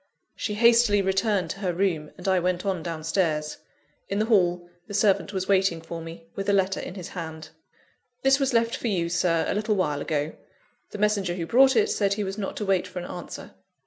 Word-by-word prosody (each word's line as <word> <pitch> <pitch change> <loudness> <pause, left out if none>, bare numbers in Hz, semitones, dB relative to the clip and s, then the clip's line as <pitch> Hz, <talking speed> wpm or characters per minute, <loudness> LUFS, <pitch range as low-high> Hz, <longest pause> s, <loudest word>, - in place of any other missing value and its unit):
She 210 - -3
hastily 230 -2 +5
returned 190 -2 +1
to 195 - -7
her 185 -3 -1
room, 170 -5 0
and 180 - -7
I 190 -1 +3
went 180 +1 -1
on 190 -4 -1
down 165 -2 -5
stairs. 160 -3 0 0.5
In 200 - -1
the 215 - +2
hall, 180 -6 +2 0.2
the 205 - -6
servant 205 -1 +2
was 190 -2 -3
waiting 190 -4 +2
for 165 +1 -7
me, 165 0 -9
with 195 +1 -3
a - - +3
letter 190 -1 +2
in 180 - -7
his 180 -3 -7
hand. 160 -3 -7 0.7
"This 270 +1 +4
was 270 -1 +1
left 230 0 +2
for - - -3
you, 175 -6 0
Sir, 170 -1 +1
a - - 0
little 215 +1 0
while 150 -7 0
ago. 150 0 -2 0.6
The - - -7
messenger 200 -4 +1
who 170 -2 -3
brought 265 +8 +5
it 435 - +4
said 200 - +1
he 210 - -2
was 195 +2 -4
not 195 - -4
to 210 - -3
wait 190 -2 +1
for 185 - -10
an 175 - -4
answer." 175 - -8
190 Hz, 220 wpm, -25 LUFS, 170-210 Hz, 0.7 s, hastily